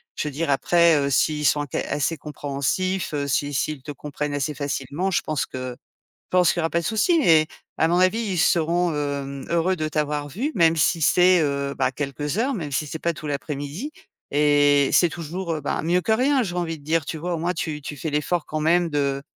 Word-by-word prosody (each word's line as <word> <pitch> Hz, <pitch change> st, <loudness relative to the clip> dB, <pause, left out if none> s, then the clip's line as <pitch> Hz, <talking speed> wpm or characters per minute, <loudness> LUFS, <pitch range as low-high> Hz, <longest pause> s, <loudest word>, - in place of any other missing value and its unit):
je -, -, -2 dB
veux 150 Hz, -, -3 dB
dire 155 Hz, +2 st, -1 dB
après, 170 Hz, +3 st, +4 dB
heu, 140 Hz, -1 st, 0 dB
s'ils 150 Hz, +2 st, +1 dB
sont 145 Hz, 0 st, +2 dB
ca -, -, -1 dB
assez 150 Hz, +3 st, 0 dB
compréhensifs, 150 Hz, +6 st, -2 dB
heu, 140 Hz, -1 st, -2 dB
s'i 145 Hz, +1 st, 0 dB
s'ils 145 Hz, 0 st, -2 dB
te 145 Hz, -, -7 dB
comprennent 145 Hz, +1 st, -4 dB
assez 145 Hz, +2 st, -1 dB
facilement, 145 Hz, +5 st, -3 dB
je 180 Hz, -, +1 dB
pense 155 Hz, -2 st, -2 dB
que 130 Hz, 0 st, -5 dB, 0.6 s
je -, -, -
pense 180 Hz, -2 st, +4 dB
qu'il -, -, -5 dB
y -, -, +1 dB
aura 165 Hz, -, 0 dB
pas 170 Hz, -, +1 dB
de 170 Hz, -, -7 dB
souci. 320 Hz, +10 st, +2 dB
Mais 160 Hz, -, +5 dB, 0.3 s
à 160 Hz, -, +4 dB
mon 175 Hz, +2 st, +2 dB
avis, 185 Hz, +5 st, +3 dB
ils 205 Hz, -6 st, -2 dB
seront, 170 Hz, +2 st, +2 dB
hem, 140 Hz, -2 st, -4 dB
heureux 170 Hz, +2 st, +1 dB
de 155 Hz, -2 st, -2 dB
t'avoir 150 Hz, -1 st, -2 dB
vu, 235 Hz, -, -3 dB
même 165 Hz, -2 st, +5 dB
si 165 Hz, +1 st, +2 dB
c'est, 180 Hz, +4 st, +5 dB
heu, 140 Hz, -2 st, -1 dB
bah, 130 Hz, -1 st, +1 dB
quelques 145 Hz, +4 st, -3 dB
heures 260 Hz, +4 st, +1 dB
même 155 Hz, -, -5 dB
si 150 Hz, +3 st, -1 dB
c'est 160 Hz, -, -5 dB
pas 170 Hz, +1 st, 0 dB
tout 155 Hz, -1 st, -7 dB
l'après-midi 145 Hz, -, -4 dB, 0.4 s
et 145 Hz, -1 st, +4 dB
c'est 175 Hz, -, +5 dB
toujours, 170 Hz, +2 st, -4 dB
heu, 155 Hz, -, -4 dB
ben, 145 Hz, -, -2 dB
mieux 175 Hz, +2 st, +2 dB
que 220 Hz, -, -3 dB
rien, 260 Hz, +4 st, +3 dB
j'ai 180 Hz, -5 st, -4 dB
envie 165 Hz, -2 st, -2 dB
de -, -, -19 dB
dire, 160 Hz, 0 st, +1 dB
tu 160 Hz, -, -5 dB
vois? 175 Hz, +3 st, -3 dB
Au -, -, -2 dB
moins 170 Hz, +3 st, -1 dB
tu 155 Hz, -4 st, -3 dB
tu 145 Hz, 0 st, -7 dB
fais 155 Hz, +3 st, -4 dB
l'effort 150 Hz, +3 st, 0 dB
quand 155 Hz, -, -3 dB
même 170 Hz, +2 st, +3 dB
de 140 Hz, -2 st, -1 dB
155 Hz, 230 wpm, -23 LUFS, 145-175 Hz, 0.6 s, Mais